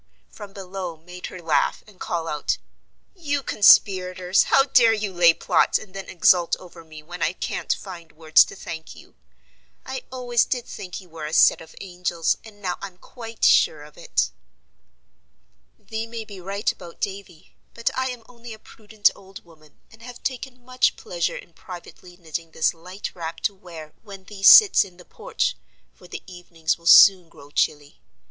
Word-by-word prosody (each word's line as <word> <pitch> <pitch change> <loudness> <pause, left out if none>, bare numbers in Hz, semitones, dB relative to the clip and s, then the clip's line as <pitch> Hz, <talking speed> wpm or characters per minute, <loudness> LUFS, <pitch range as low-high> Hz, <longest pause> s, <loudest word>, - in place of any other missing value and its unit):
from 205 -1 -11
below 190 -3 -7
made 180 +3 -10
her 185 - -10
laugh, 165 -3 0
and 205 -4 -20
call 165 -1 -3
out: 150 -2 -2 0.6
"You 285 -7 -3
conspirators! 185 -3 +4
how 270 - +4
dare 245 -5 +4
you 210 -3 -3
lay 175 -1 +6
plots, - - +2
and 190 - -13
then 195 0 -8
exult 175 -1 +3
over 175 -2 -14
me 155 -1 -13
when 175 +2 -10
I 165 +1 +1
can't - - -4
find 175 -4 -6
words 155 0 +5
to - - -11
thank 160 -1 -8
you? - - -17 0.7
I 265 0 -5
always 245 -2 +1
did 245 -2 -3
think 185 +1 -8
you 180 - -18
were 160 -2 -7
a 155 - -8
set - - +5
of 160 - -14
angels, 175 -3 -2
and 205 -2 -16
now 180 -1 -3
I'm 190 -2 -8
quite 225 +3 -6
sure 150 -2 +4
of 150 0 -15
it." 60 - -1 1.5
"Thee 220 +1 -6
may 230 -1 -7
be 200 -3 -11
right 200 +3 -2
about 170 -1 -13
Davy, 195 -5 -7 0.2
but 230 - -2
I 260 0 -1
am 245 -2 -8
only 235 -2 -12
a - - -11
prudent 215 -1 -1
old 195 -1 -14
woman, 155 -3 -22
and 225 - -18
have 245 +1 -12
taken 255 -1 -5
much 255 0 +1
pleasure 170 -2 -3
in 170 - -13
privately 175 0 -12
knitting 165 -1 -7
this 160 - +1
light 180 +4 -8
wrap 165 -2 -7
to 205 - 0
wear 165 -5 -12
when 195 -3 -12
thee 195 0 -12
sits 395 - +8
in 185 -3 -15
the 180 - -16
porch, - - -3 0.4
for 60 - -18
the - - -9
evenings 170 -3 -4
will 170 - -9
soon 185 -2 +8
grow 145 -3 -16
chilly. 145 - -2
185 Hz, 180 wpm, -23 LUFS, 165-220 Hz, 1.5 s, sits